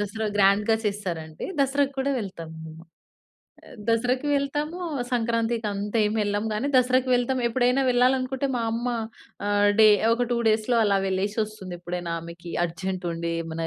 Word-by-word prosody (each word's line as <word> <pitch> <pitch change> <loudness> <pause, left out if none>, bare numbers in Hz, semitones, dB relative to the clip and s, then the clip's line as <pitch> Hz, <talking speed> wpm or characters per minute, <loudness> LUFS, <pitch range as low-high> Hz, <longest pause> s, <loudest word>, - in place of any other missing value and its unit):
దసరా 210 +2 -3
గ్రాండ్‌గా 205 +2 +4
చేస్తారంటే 175 -6 -4 0.2
దసరా 280 +1 +3
కూడా 275 +1 0
వెళ్తాం 185 -6 -6
మేము. 160 +1 -10 0.8
ఆ! - - -19 0.2
దసరాకి 250 +4 +1
వెళ్తాము, 295 +4 -2 0.3
సంక్రాంతి 230 0 +1 0.2
అంతేమి 210 +2 0
ఎల్లం 205 +1 -1
గానీ, 245 +7 -1
దసరాకి 255 +1 +3
వెళ్తాం 245 +1 +1
ఎప్పుడైనా 250 +2 +2
వెళ్ళాలనుకుంటే 255 +2 +2
మా 235 - -1
అమ్మ 240 +2 -2 0.6
ఆహ్, 205 0 +3
డే 215 - +9 0.3
ఒక 245 +1 -1
2 235 - +1
డేస్‌లో 220 +2 +2
అలా 200 -1 +3
వెళ్లేసొస్తుందెప్పుడైనా 190 -3 -3
ఆమెకి 170 +1 -9
అర్జెంట్ 185 +2 -5
ఉండి, 170 0 -3
ఏమైనా 165 0 -4
215 Hz, 135 wpm, -25 LUFS, 190-245 Hz, 0.8 s, డే